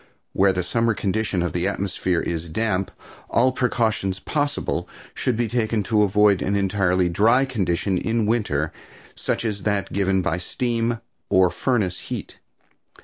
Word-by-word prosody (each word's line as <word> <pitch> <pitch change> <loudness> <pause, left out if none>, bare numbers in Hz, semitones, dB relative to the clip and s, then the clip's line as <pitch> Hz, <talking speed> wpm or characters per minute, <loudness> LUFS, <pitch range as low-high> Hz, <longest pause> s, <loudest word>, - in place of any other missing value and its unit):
Where 95 0 +4
the 90 -1 -1
summer 115 +4 +1
condition 100 -2 -1
of 85 -3 -2
the 90 0 0
atmosphere 95 -2 -1
is 85 0 -3
damp 95 +1 0 0.4
all 125 +3 +3
precautions 110 -6 0
possible 145 - -2 0.2
should 125 -3 -1
be 120 -1 +1
taken 110 -2 0
to 105 +2 +2
avoid 105 -1 +4
an 100 - 0
entirely 95 -2 +2
dry 115 +9 +3
condition 95 -6 0
in 115 -1 0
winter, 100 -10 0 0.4
such - - -2
as 105 -3 -2
that 100 -1 -1
given 95 -1 +1
by 90 -1 0
steam 115 +3 -1 0.3
or 95 -1 +4
furnace 110 -9 0
heat. - - -7
100 Hz, 145 wpm, -23 LUFS, 90-115 Hz, 0.4 s, Where